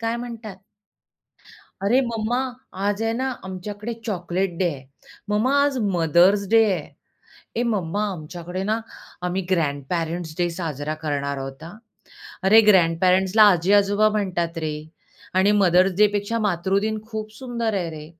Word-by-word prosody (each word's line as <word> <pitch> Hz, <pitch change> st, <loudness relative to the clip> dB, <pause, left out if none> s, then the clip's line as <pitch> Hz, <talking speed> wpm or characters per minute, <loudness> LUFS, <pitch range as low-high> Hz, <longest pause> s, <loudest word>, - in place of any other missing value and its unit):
काय 230 Hz, 0 st, -1 dB
म्हणतात. 230 Hz, -4 st, -7 dB, 1.3 s
"अरे 235 Hz, +7 st, +3 dB
मम्मा, 235 Hz, -1 st, -1 dB, 0.5 s
आज 205 Hz, +1 st, 0 dB
आहे 225 Hz, 0 st, 0 dB
ना 260 Hz, +3 st, -1 dB, 0.2 s
आमच्याकडे 205 Hz, +4 st, -6 dB
चॉकलेट 185 Hz, -2 st, -1 dB
डे 185 Hz, -, +2 dB
आहे. 135 Hz, -2 st, -11 dB, 0.4 s
मम्मा, 215 Hz, +6 st, +1 dB
आज 285 Hz, -2 st, +1 dB, 0.2 s
मदर्स 175 Hz, +5 st, +4 dB
डे 225 Hz, 0 st, +6 dB
आहे. 185 Hz, -, -3 dB, 0.7 s
ए 235 Hz, -, +1 dB
मम्मा, 200 Hz, +1 st, -1 dB
आमच्याकडे 175 Hz, +2 st, -6 dB
ना 220 Hz, +1 st, +1 dB, 0.5 s
आम्ही 185 Hz, +2 st, -2 dB
ग्रँडपेरेंट्स 165 Hz, +1 st, -2 dB
डे 175 Hz, -1 st, +1 dB
साजरा 155 Hz, -4 st, -4 dB
करणार 140 Hz, -2 st, -2 dB
आहोत 135 Hz, +2 st, -7 dB
हं." 170 Hz, +5 st, -10 dB, 0.7 s
अरे, 215 Hz, +4 st, +7 dB
ग्रँडपेरेंट्सला 185 Hz, +2 st, +4 dB
आजी-आजोबा 200 Hz, +4 st, +3 dB
म्हणतात 175 Hz, -4 st, -2 dB
रे 155 Hz, -, -2 dB, 0.7 s
आणि 195 Hz, +2 st, +4 dB
मदर्स 185 Hz, +1 st, +4 dB
डे 210 Hz, -, +8 dB
पेक्षा 205 Hz, +3 st, -2 dB
मातृदिन 200 Hz, +4 st, 0 dB
खूप 215 Hz, -1 st, -6 dB
सुंदर 235 Hz, -4 st, -2 dB
आहे 175 Hz, -3 st, -2 dB
रे. 150 Hz, -, -9 dB
190 Hz, 135 wpm, -23 LUFS, 170-215 Hz, 1.3 s, डे